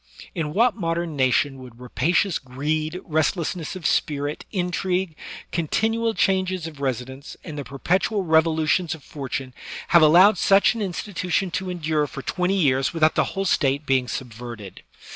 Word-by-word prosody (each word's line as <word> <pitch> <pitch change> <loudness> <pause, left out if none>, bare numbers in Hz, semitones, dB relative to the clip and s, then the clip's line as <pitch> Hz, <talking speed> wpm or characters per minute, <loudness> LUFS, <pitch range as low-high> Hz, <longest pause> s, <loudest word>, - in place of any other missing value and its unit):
In 150 -1 -3
what 235 +2 +3
mod 165 -5 -2
em 170 -3 -3
nation 135 +1 +1
would 125 -2 -12
rapacious 165 - 0
greed, 155 +6 -3
restlessness 160 +1 -1
of 180 -4 -8
spirit, 145 0 -1
intrigue, 180 -2 -1 0.4
continual 225 +7 0
changes 185 -2 +1
of 155 -3 -8
residence, 130 +1 -4
and 155 -4 -7
the 145 - -4
perpetual 185 +9 0
revolutions 160 +1 +2
of 155 - -16
fortune 135 -2 -5 0.4
have 170 -2 +6
allowed 175 +6 +6
such 195 +3 +4
an 230 - -5
institution 185 -1 -2
to 185 +2 -3
endure 155 -4 -1
for 135 - -8
twenty 185 +2 0
years 135 -3 +2
without 155 -1 +3
the - - +2
whole 195 0 -3
State 145 -4 +1
being 130 -2 +1
subverted? 120 -5 -7
160 Hz, 150 wpm, -23 LUFS, 140-185 Hz, 0.4 s, have